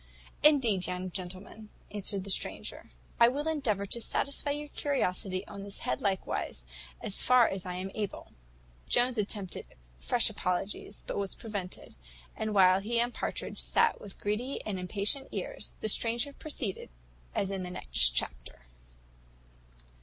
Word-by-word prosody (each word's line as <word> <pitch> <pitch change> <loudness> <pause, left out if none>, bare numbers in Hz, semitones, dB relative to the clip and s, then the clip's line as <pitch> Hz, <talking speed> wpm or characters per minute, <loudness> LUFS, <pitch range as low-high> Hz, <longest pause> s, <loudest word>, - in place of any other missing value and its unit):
"Indeed, 240 - +5
young 180 0 -3
gentleman," 190 +4 -5 0.2
answered 200 -1 -1
the 200 - -1
stranger, - - -2 0.3
"I 235 - +9
will 285 +5 -1
endeavour 235 -11 0
to 235 +4 -3
satisfy 280 +5 0
your 295 +1 -2
curiosity 190 -10 -1
on 200 - -8
this 200 0 -7
head 130 - -1
likewise, 190 - -1 0.4
as 195 - +2
far 250 -2 +6
as 190 -1 -3
I 180 - -3
am 185 +1 -4
able." 210 -2 -4 0.6
Jones 245 -1 +3
attempted 200 -3 -3 0.2
fresh 60 - +5
apologies, 195 +3 -2
but - - -3
was 200 -1 -2
prevented; 200 -5 -6 0.4
and 215 -1 -2
while 185 -1 +7
he 230 +4 0
and 240 +1 +1
Partridge - - -3
sat 460 -1 +3
with 200 -2 -10
greedy 225 +6 -1
and 200 -3 -2
impatient 205 +9 +1
ears, - - -4
the - - 0
stranger 235 +6 +4
proceeded 260 -11 -3 0.5
as 195 - 0
in 195 -1 -2
the 180 - -4
next 60 - +3
chapter. - - -2
205 Hz, 145 wpm, -31 LUFS, 185-240 Hz, 0.6 s, I